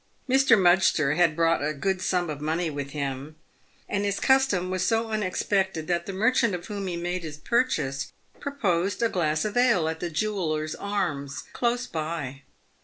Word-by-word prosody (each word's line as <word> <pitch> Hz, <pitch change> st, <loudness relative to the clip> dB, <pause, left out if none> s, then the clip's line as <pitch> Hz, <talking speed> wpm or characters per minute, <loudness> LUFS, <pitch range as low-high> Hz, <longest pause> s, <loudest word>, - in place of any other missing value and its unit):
Mr. 265 Hz, -4 st, +5 dB
Mudgster 175 Hz, -5 st, +4 dB
had 170 Hz, -2 st, +3 dB
brought 165 Hz, -1 st, +2 dB
a 155 Hz, +1 st, -1 dB
good 190 Hz, +5 st, -1 dB
sum 180 Hz, -1 st, 0 dB
of 145 Hz, -1 st, -6 dB
money 160 Hz, +2 st, -1 dB
with 145 Hz, -1 st, -5 dB
him, 140 Hz, +1 st, -4 dB, 0.5 s
and 200 Hz, 0 st, -1 dB
his 200 Hz, -1 st, -1 dB
custom 265 Hz, -10 st, +2 dB
was 185 Hz, -1 st, 0 dB
so 225 Hz, 0 st, +1 dB
unexpected 190 Hz, -4 st, 0 dB
that 170 Hz, 0 st, -1 dB
the -, -, -3 dB
merchant 225 Hz, +1 st, +2 dB
of 175 Hz, -, -7 dB
whom 200 Hz, -2 st, -4 dB
he 175 Hz, -2 st, -3 dB
made 175 Hz, +1 st, -2 dB
his 155 Hz, -3 st, -7 dB
purchase 150 Hz, -, 0 dB, 0.3 s
proposed 200 Hz, -8 st, -1 dB
a 230 Hz, -, +3 dB
glass 155 Hz, -4 st, 0 dB
of 210 Hz, -, -3 dB
ale 235 Hz, -10 st, +3 dB
at 160 Hz, 0 st, -3 dB
the 175 Hz, -, -3 dB
Jewellers' 155 Hz, -4 st, -1 dB
Arms, 170 Hz, -9 st, -3 dB
close 245 Hz, +1 st, 0 dB
by. 155 Hz, -4 st, -4 dB
180 Hz, 175 wpm, -26 LUFS, 155-205 Hz, 0.5 s, Mr